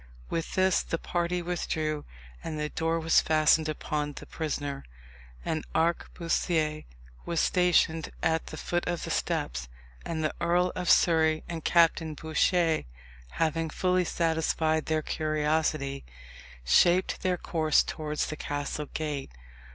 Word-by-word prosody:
With 165 - -3
this 185 -1 +3
the 165 - -3
party 175 +1 -2
withdrew, 155 -3 -2 0.4
and 155 -1 -4
the 150 0 -2
door 165 +1 -1
was 165 0 +4
fastened 155 0 +3
upon 150 -1 -2
the - - -9
prisoner. 145 -3 -4 0.6
An 155 -1 -1
arquebusier 165 -1 0 0.4
was 170 -2 -1
stationed 175 -3 +2
at 160 0 +1
the - - -7
foot 175 0 -2
of 175 -1 -2
the - - -4
steps; - - -2 0.3
and 160 -1 -3
the 155 - 0
Earl 175 +1 +2
of 180 -2 -2
Surrey 160 -2 +4
and 165 -2 -5
Captain 165 -2 +3
Bouchier 160 +2 +1 0.5
having 165 0 0
fully 180 +3 +1
satisfied 160 -2 0
their 155 -1 0
curiosity, 155 -3 -1 0.6
shaped 175 - +4
their 185 -1 +1
course 155 -3 +2
towards 150 -1 -3
the 155 - -5
castle 145 0 -4
gate. 150 -3 -3
160 Hz, 130 wpm, -28 LUFS, 155-170 Hz, 0.6 s, was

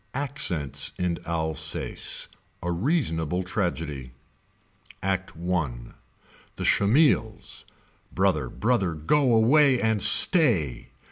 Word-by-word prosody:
ACCENTS 135 - -2
IN 90 -2 -2
ALSACE. 80 -2 -3 0.4
A 90 - -2
REASONABLE 90 - -1
TRAGEDY. 80 - -4 0.9
Act 95 -1 -2
I. 85 -3 -1 0.9
The - - -5
Schemils. 110 -1 +1 0.5
Brother 85 -9 0
brother 100 - -1
go 130 - +1
away 130 +4 +4
and 110 -3 0
stay. 110 - +4
95 Hz, 85 wpm, -25 LUFS, 80-120 Hz, 0.9 s, away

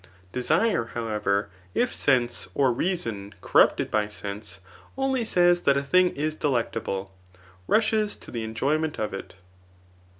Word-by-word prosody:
Desire, 160 - +1
however, 105 -3 0 0.3
if - - +1
sense, 120 +6 +1
or 135 -3 +3
rea 180 +10 0
son 105 - -5
[corruptefd - - +3
by 105 -1 +1
sense39 100 -1 -7 0.4
only 265 -2 +1
says 175 -4 +3
that 140 -3 +3
a 140 - 0
thing 180 +6 +4
isdelec 145 -5 0
table, 95 -3 -4 0.5
rushes 215 -1 +2
to - - -13
the 115 -2 -3
enjoyment 145 +8 -1
of 105 -2 -2
it. 95 - -7
125 Hz, 135 wpm, -26 LUFS, 105-175 Hz, 0.5 s, thing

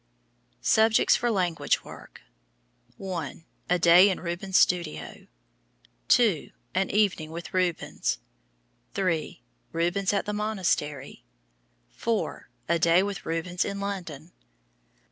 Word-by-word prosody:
SUBJECTS 220 0 +4
FOR 240 - 0
LANGUAGE 180 -6 0
WORK. - - -13 0.7
1. 170 -5 -5 0.2
A 180 - +3
Day 175 +3 +7
in 190 - -2
Rubens' 180 +2 -1
Studio. 80 - 0 0.8
2. 215 -11 +3 0.2
An 190 +1 0
Evening 195 -7 +1
with 165 +1 -8
Rubens. 180 - -1 0.8
3. 170 - -1 0.3
Rubens 175 +4 0
at 200 - 0
the 210 - -3
Monastery. 180 -10 -2 0.7
4. - - -3 0.2
A 170 0 +2
Day 170 +3 +4
with 200 -1 -5
Rubens 165 +2 -1
in 200 0 -4
London. 180 -6 -5
180 Hz, 105 wpm, -27 LUFS, 165-200 Hz, 0.8 s, Day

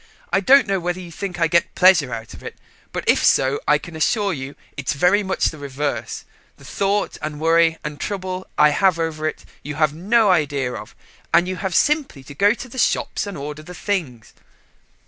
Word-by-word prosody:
I 195 - +4
don't 270 +8 +5
know 195 -1 0
whether 175 +1 -3
you 175 -2 -9
think 180 0 -6
I 165 - +3
get 170 +1 +4
any - - -35
pleasure 175 -8 +5
out 115 -1 -6
of - - -12
it, - - -9 0.3
but - - -4
if - - +3
so 135 +2 +3
I 150 - +5
can 165 +2 -11
assure 200 +5 +1
you 140 -1 -7 0.2
it's 140 +1 -2
very 180 +8 +3
much 190 -1 -1
the 155 - -1
reverse. 140 -4 -4 0.3
The - - -16
thought 200 +1 -1
and 150 -1 -5
worry 165 0 +3
and 150 -1 -6
trouble 185 -2 -4
I 150 0 +6
have 180 +4 +2
over 160 -2 -2
it - - -5 0.2
you 150 +1 -6
have 155 -1 +2
no 205 +5 +3
idea 145 -7 0
of, 105 - -9 0.4
and 175 - +4
you 185 0 -3
have 190 -3 -3
simply 290 - +1
to 140 - -11
go 205 +9 +3
to 250 - -8
the 255 +2 -8
shops 210 - 0
and 200 -4 -6
order 150 +2 -6
the 180 +3 -11
things." 155 - -4
165 Hz, 210 wpm, -21 LUFS, 145-190 Hz, 0.4 s, I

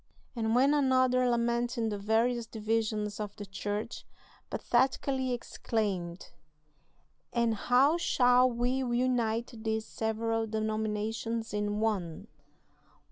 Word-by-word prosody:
And 225 -1 0
when 270 +4 +5
another, 255 -3 +3
lamenting 235 0 0
the 205 - -3
various 225 +3 +1
divisions 215 -1 -1
of 210 -1 -5
the 205 - -7
Church, 205 +3 -4 0.5
pathetically 260 +1 +1
exclaimed: 200 -7 -3 1.0
'And 235 -2 +1
how 255 +8 +3
shall 250 -6 +4
we 240 +1 0
unite 240 -2 0
these 220 0 -1
several 225 0 -1
denominations 220 +1 -2
in 210 0 -1
one?' 190 -7 -1
225 Hz, 100 wpm, -30 LUFS, 215-245 Hz, 1.0 s, when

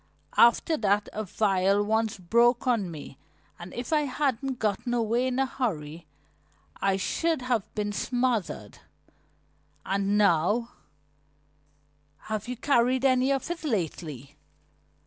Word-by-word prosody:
After 235 +7 +4
that 205 -1 +1
a 215 - -3
vial 195 0 +1
once 220 +1 0
broke 235 +7 +2
on 230 -7 +1
me 150 -4 -10 0.4
and 175 +1 -9
if 240 +5 -4
I 300 -1 +3
hadn't 270 -1 -1
gotten 220 +3 -1
away 235 +2 +1
in 255 0 -2
a 270 - +2
hurry 170 - -4 0.7
I 195 -1 +2
should 320 +8 -1
have 245 -5 -1
been 205 -1 -2
smothered. 245 -2 -2 1.1
And 200 +1 0
now 205 +4 +2 0.7
" 145 0 -40 0.2
"Have 215 +1 -3
you 250 0 -4
carried 255 0 +2
any 260 0 +3
of 275 +4 -1
it 345 0 -5
lately?" 160 - -3
220 Hz, 125 wpm, -27 LUFS, 185-250 Hz, 1.1 s, After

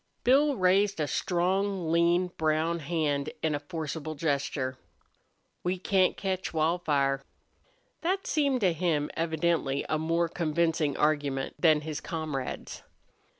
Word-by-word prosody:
Bill 280 +3 +4
raised 195 +1 +3
a 150 - +1
strong, 185 +2 0
lean, 170 +2 +3
brown 160 +2 +1
hand 145 -2 -1
in 160 -1 +1
a 145 - -1
forcible 155 0 -5
gesture. 140 -3 -1 0.8
"We 180 +1 -1
can't 185 0 +2
ketch 190 -2 -3
Wildfire!" 150 -4 +1 0.8
That 375 +3 -1
seemed 280 -5 +1
to 185 -4 +3
him, 160 -3 0
evidently, 160 -4 0
a 155 - +1
more 165 +2 +1
convincing 160 -2 0
argument 145 -3 0
than 155 -3 +4
his 155 -1 -5
comrade's. 155 -6 -4
165 Hz, 120 wpm, -28 LUFS, 150-180 Hz, 0.8 s, Bill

